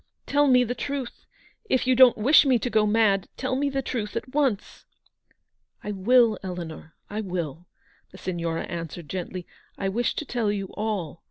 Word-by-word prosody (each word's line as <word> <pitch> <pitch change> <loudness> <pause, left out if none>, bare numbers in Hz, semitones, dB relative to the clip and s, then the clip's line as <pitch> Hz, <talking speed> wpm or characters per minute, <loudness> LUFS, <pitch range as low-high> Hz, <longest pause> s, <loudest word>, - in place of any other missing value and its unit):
Tell 290 +1 +3
me 250 -2 +5
the 245 0 -2
truth. 275 -1 -5 0.4
If 260 - +2
you 255 - +4
don't 255 -1 +7
wish 260 +8 +6
me 265 -4 +3
to 245 +1 -3
go 215 -1 +3
mad, 210 -3 +2
tell 260 0 -1
me 285 +2 0
the 270 -1 -2
truth 220 -4 -4
at 250 +3 -5
once." 270 -9 -1 1.0
u - - -5
I - - -1
will, 225 +3 +3
Eleanor, 170 -3 -7
I 210 +1 -4
will," 175 -4 -5 0.4
the - - -14
Signora 170 -2 -3
answered 170 -1 -6
gently. 180 0 -5 0.2
" - - -30
I 195 - -1
wish 235 +5 -1
to 305 - -4
tell 235 -5 -1
you 195 -2 -3
all. 200 -7 -3
215 Hz, 185 wpm, -25 LUFS, 185-255 Hz, 1.0 s, don't